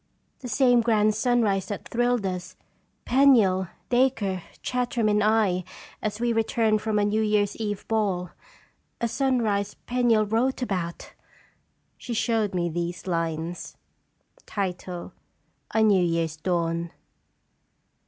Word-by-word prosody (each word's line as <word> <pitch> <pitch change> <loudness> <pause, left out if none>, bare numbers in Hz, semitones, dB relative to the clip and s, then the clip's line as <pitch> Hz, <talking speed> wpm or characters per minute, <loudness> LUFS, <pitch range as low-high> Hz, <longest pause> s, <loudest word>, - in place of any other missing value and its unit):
" - - -45
The 255 - -6
same 245 -2 +4
grand 215 -2 +3
sunrise 220 -4 +1
that 205 -3 -6
thrilled 240 -2 +1
us, 185 -1 -4 0.5
Penniel, 230 -9 +4 0.2
Dacre, 240 -7 +1 0.2
Chartram, 245 -2 0
and 210 0 +2
I, 210 -4 +2 0.4
as 215 0 -3
we 240 0 +1
re 225 - +3
turned 220 -1 +1
from 215 -1 -1
a 205 - +3
New 215 +1 +1
Year's 210 -1 +1
Eve 205 -3 -4
ball. 195 -6 0 0.7
A 235 - 0
sunrise 230 -5 0
Penniel 240 -3 +2
wrote 245 +5 0
about." 180 -7 -4 0.9
She 240 - -5
showed 220 -4 0
me 175 -1 0
these 175 +1 -4
lines: 165 -1 -3 0.8
"A 185 +3 -4
NEW 200 -4 +4
YEAR'S 165 -2 -1
DAWN. 170 0 -1
210 Hz, 125 wpm, -25 LUFS, 185-235 Hz, 0.9 s, same